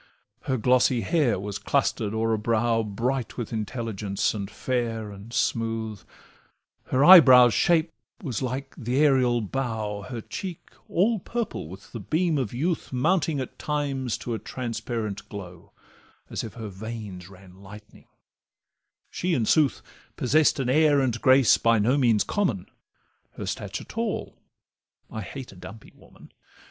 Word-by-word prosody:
Her 130 Hz, -2 st, 0 dB
glossy 125 Hz, +1 st, +3 dB
hair 125 Hz, -, +1 dB
was 100 Hz, +1 st, -5 dB
cluster'd 110 Hz, -2 st, 0 dB
o'er 110 Hz, +1 st, 0 dB
a -, -, +1 dB
brow 115 Hz, +1 st, +1 dB
Bright 115 Hz, +4 st, -3 dB
with 120 Hz, -2 st, -5 dB
intelligence, 110 Hz, -3 st, -2 dB
and 100 Hz, -2 st, -5 dB
fair, 115 Hz, -4 st, -3 dB
and 100 Hz, +3 st, -11 dB
smooth; 115 Hz, -3 st, -1 dB, 0.8 s
Her 130 Hz, +3 st, +2 dB
eyebrow's 130 Hz, -10 st, +9 dB
shape 165 Hz, -1 st, +2 dB, 0.3 s
was 125 Hz, -, -3 dB
like 130 Hz, +1 st, -4 dB
th' 115 Hz, -, -6 dB
aerial 130 Hz, -3 st, +3 dB
bow, 110 Hz, -3 st, -3 dB
Her 120 Hz, -3 st, -5 dB
cheek 180 Hz, -, -7 dB, 0.2 s
all 210 Hz, +5 st, +2 dB
purple 230 Hz, -, -4 dB
with 95 Hz, +4 st, -12 dB
the 115 Hz, -, -6 dB
beam 160 Hz, -, 0 dB
of 125 Hz, -6 st, -2 dB
youth, 160 Hz, +7 st, -2 dB
Mounting 155 Hz, +3 st, +1 dB
at 130 Hz, -, -6 dB
times 140 Hz, -5 st, -2 dB
to 120 Hz, -, -5 dB
a 110 Hz, -, -3 dB
transparent 110 Hz, -4 st, -5 dB
glow, 90 Hz, -4 st, -10 dB, 0.6 s
As -, -, -3 dB
if 115 Hz, -, -8 dB
her 110 Hz, -3 st, -6 dB
veins 100 Hz, -3 st, -8 dB
ran 95 Hz, 0 st, -16 dB
lightning; 105 Hz, +2 st, -14 dB, 1.0 s
she, 180 Hz, -1 st, -1 dB
in 115 Hz, -, 0 dB
sooth, 150 Hz, +3 st, +2 dB, 0.3 s
Possess'd 150 Hz, +4 st, +3 dB
an 130 Hz, -, -1 dB
air 145 Hz, +2 st, +4 dB
and 120 Hz, -4 st, 0 dB
grace 130 Hz, -2 st, +5 dB
by 115 Hz, 0 st, +3 dB
no 115 Hz, +6 st, +2 dB
means 120 Hz, -7 st, +3 dB
common: 125 Hz, -, -1 dB, 0.7 s
Her -, -, -6 dB
stature -, -, -4 dB
tall—I 110 Hz, -, -7 dB
hate 130 Hz, +6 st, -8 dB
a -, -, -15 dB
dumpy 95 Hz, +5 st, -12 dB
woman. -, -, -18 dB
120 Hz, 145 wpm, -25 LUFS, 105-135 Hz, 1.0 s, eyebrow's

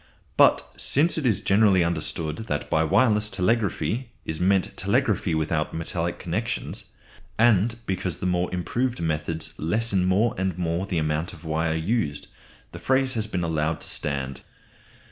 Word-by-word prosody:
But -, -, +5 dB
since 155 Hz, +5 st, +2 dB
it 140 Hz, -, 0 dB
is 105 Hz, -6 st, +1 dB
generally 100 Hz, -2 st, +4 dB
understood 80 Hz, -1 st, -2 dB
that 75 Hz, -, -3 dB
by 80 Hz, -, +3 dB
wireless 105 Hz, +4 st, +3 dB
telegraphy 110 Hz, -, 0 dB, 0.2 s
is 80 Hz, -, -3 dB
meant 95 Hz, +1 st, +2 dB
telegraphy 80 Hz, -, +1 dB
without 80 Hz, 0 st, -1 dB
metal 85 Hz, +1 st, -2 dB
connections, 110 Hz, +7 st, -4 dB, 0.5 s
and 115 Hz, -1 st, +4 dB
because 95 Hz, -2 st, -2 dB
the 95 Hz, -, -5 dB
more 90 Hz, 0 st, 0 dB
improved 120 Hz, +8 st, -1 dB
methods 80 Hz, 0 st, -2 dB
lessen 100 Hz, +2 st, +1 dB
more 100 Hz, +5 st, +2 dB
and 95 Hz, -2 st, -1 dB
more 85 Hz, +2 st, -1 dB
the 90 Hz, -, -2 dB
amount 75 Hz, +1 st, -1 dB
of 85 Hz, -, -13 dB
wire 80 Hz, +1 st, 0 dB
used, 80 Hz, -3 st, -1 dB, 0.4 s
the -, -, -9 dB
phrase 130 Hz, 0 st, +2 dB
has 110 Hz, -2 st, -2 dB
been 90 Hz, -5 st, -2 dB
allowed 80 Hz, -1 st, -1 dB
to -, -, -2 dB
stand. 70 Hz, -2 st, -2 dB
90 Hz, 150 wpm, -25 LUFS, 80-110 Hz, 0.5 s, But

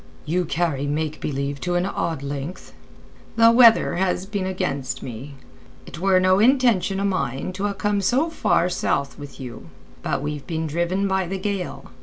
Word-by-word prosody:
"You 175 Hz, +3 st, 0 dB
carry 155 Hz, -4 st, -1 dB
make 155 Hz, +1 st, -2 dB
believe 140 Hz, 0 st, -3 dB
to 180 Hz, -1 st, -1 dB
an 175 Hz, +1 st, +1 dB
odd 165 Hz, -6 st, -2 dB
length." 140 Hz, +5 st, -6 dB, 0.6 s
"The 230 Hz, 0 st, +7 dB
weather 230 Hz, -6 st, +6 dB
has 185 Hz, 0 st, 0 dB
been 200 Hz, -2 st, -3 dB
against 140 Hz, -9 st, -3 dB
me. 130 Hz, +4 st, -8 dB, 0.5 s
It -, -, -9 dB
were 190 Hz, 0 st, +4 dB
no 185 Hz, +1 st, +4 dB
intention 230 Hz, -5 st, +3 dB
o' 200 Hz, -, 0 dB
mine 140 Hz, -3 st, -2 dB
to 195 Hz, +2 st, -2 dB
ha' 200 Hz, -, -9 dB
come 205 Hz, -1 st, 0 dB
so 270 Hz, -, +1 dB
far 180 Hz, -, +2 dB
south 140 Hz, -5 st, -1 dB
with 145 Hz, -1 st, -10 dB
you. 120 Hz, -10 st, -9 dB, 0.3 s
But 135 Hz, -, -2 dB
we've 145 Hz, -2 st, -4 dB
been 160 Hz, -1 st, -2 dB
driven 175 Hz, +5 st, 0 dB
by 190 Hz, -1 st, 0 dB
the 190 Hz, +2 st, -3 dB
gale. 190 Hz, -, -4 dB
180 Hz, 175 wpm, -23 LUFS, 145-195 Hz, 0.6 s, The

